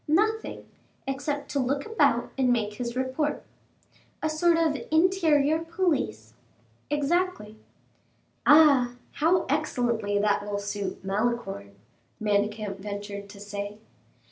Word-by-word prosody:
"Nothing, 435 +8 0 0.4
except 280 +2 -3
to 285 - 0
look 275 +2 0
about 445 0 +2
and 260 -2 +2
make 215 -3 0
his 235 +2 -4
report." 260 +4 -1 0.8
"A 310 - +1
sort 335 +2 +3
of 325 -3 +2
interior 315 -3 +3
police?" 300 - -1 0.6
"Exactly." 295 - -1 0.8
"Ah, 285 -5 +6 0.2
how 335 +5 +2
excellently 240 -8 0
that 205 0 +2
will 205 0 -3
suit 200 -1 -4
Malicorne," 195 - -2 0.4
Manicamp 210 -1 0
ventured 200 0 -6
to 205 -1 -12
say. 205 0 -6
250 Hz, 110 wpm, -27 LUFS, 205-310 Hz, 0.8 s, Ah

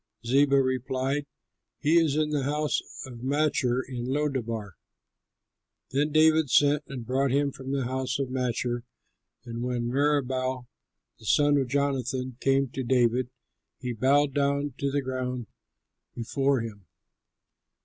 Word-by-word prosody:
Ziba 140 +3 +4
replied, 130 +2 -1 0.5
"He 160 +3 +4
is 155 -4 +2
in 155 0 +1
the 145 -2 +1
house 150 +2 0 0.2
of 120 -3 -10
Machir 135 -3 +1
in 125 -2 -5
Lodebar." 130 -7 -2 1.2
Then 145 +3 +1
David 155 -1 +4
sent 145 +4 +4
and 130 -4 -7
brought 135 +3 +1
him 140 +2 +1
from 135 0 -7
the 140 -1 0
house 130 +1 -2
of 135 -2 -3
Machir; 120 -1 -1 0.6
and 115 0 -5
when 120 -1 -2
Meribaal 130 -2 0 0.5
the 110 - -15
son 145 +6 +4
of 135 -2 +1
Jonathan 130 -2 -1
came 135 0 +2
to 130 - -4
David, 125 0 +2 0.5
he 125 -2 -4
bowed 135 +4 +3
down 140 0 0
to 140 - 0
the 140 0 -1
ground 125 -2 -3 0.7
before 135 +2 0
him. 100 -5 -8
130 Hz, 135 wpm, -27 LUFS, 125-145 Hz, 1.2 s, Ziba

